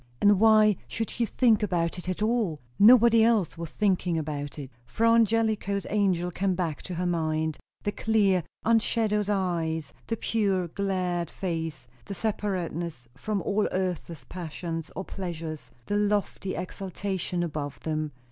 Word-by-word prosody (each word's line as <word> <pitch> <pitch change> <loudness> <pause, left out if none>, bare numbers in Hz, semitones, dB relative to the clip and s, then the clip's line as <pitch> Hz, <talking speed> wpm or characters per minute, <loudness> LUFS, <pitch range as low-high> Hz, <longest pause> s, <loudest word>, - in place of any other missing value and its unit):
And 205 -2 +5
why 215 -2 +6
should 225 -1 -3
she 235 -1 -1
think 230 -3 +3
about 175 -3 0
it 180 - -6
at 185 +3 -1
all? 215 -9 +1 0.2
nobody 230 +1 +7
else 220 -7 +2
was 165 -1 -6
thinking 180 -4 +1
about 145 -2 -4
it. 140 -3 -7 0.2
Fra 230 - +2
Angelico's 220 -3 +2
angel 185 -4 +1
came 190 +1 0
back 170 -5 -2
to 180 - -6
her 180 +2 -1
mind; 160 -2 0 0.2
the 205 - 0
clear, 205 -5 +2 0.2
unshadowed 220 -2 +2
eyes, 165 -6 -1
the 225 - -1
pure, 195 -7 0
glad 180 -3 -1
face, 165 -7 -4 0.2
the 200 - -6
separateness 175 - -3
from 195 +8 -3
all 205 +1 +1
earth's 180 -3 -3
passions 165 -1 -5
or 190 - -4
pleasures, 165 -5 -6 0.2
the 205 - -1
lofty 205 -2 0
exaltation 185 -1 -3
above 145 -4 -4
them. 155 -1 -2
185 Hz, 145 wpm, -27 LUFS, 165-210 Hz, 0.2 s, nobody